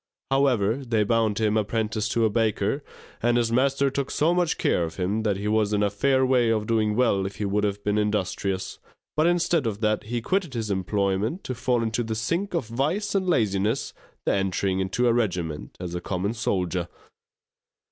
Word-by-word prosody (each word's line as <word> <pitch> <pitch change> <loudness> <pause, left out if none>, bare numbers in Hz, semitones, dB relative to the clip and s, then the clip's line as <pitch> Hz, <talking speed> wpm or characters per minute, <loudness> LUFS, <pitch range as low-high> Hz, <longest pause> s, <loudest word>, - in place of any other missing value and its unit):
However, 125 -5 +2
they 115 -6 0
bound 110 -1 +1
him 110 -1 +1
apprentice 110 0 -1
to 115 +1 +2
a - - +3
baker, 110 +4 0 0.4
and 120 +1 +3
his 115 -1 +1
master 135 +2 +2
took 140 0 -2
so 160 +3 +2
much 175 -2 +1
care 85 - +1
of 80 - -4
him 100 +4 -1
that 105 -3 0
he 100 +1 -3
was 105 -1 +2
in 105 0 +2
a 100 - +1
fair 130 +5 +2
way 125 -3 +3
of 110 -2 +1
doing 110 -1 +1
well 115 -5 +2
if 100 - -8
he 105 - -3
would 105 +1 0
have 100 0 -1
been 105 +1 +1
industrious; 100 -2 -2 0.4
but 155 +2 +3
instead 170 -5 +2
of 105 -2 -3
that 110 -1 +1
he 120 +2 -2
quitted 175 - -1
his 110 -3 -2
employment 100 - -1
to 130 - -3
fall 125 -1 0
into 115 +1 -1
that 110 -1 -3
sink 170 - -1
of 165 - 0
vice 140 - -1
and 190 -2 +1
laziness, 105 - +1 0.3
the - - +2
entering 95 0 0
into 95 +6 0
a 120 - +4
regiment 90 -10 -2
as 90 -1 -5
a 90 - -3
common 95 +4 -2
soldier. 90 -6 -1
110 Hz, 200 wpm, -25 LUFS, 100-125 Hz, 0.4 s, a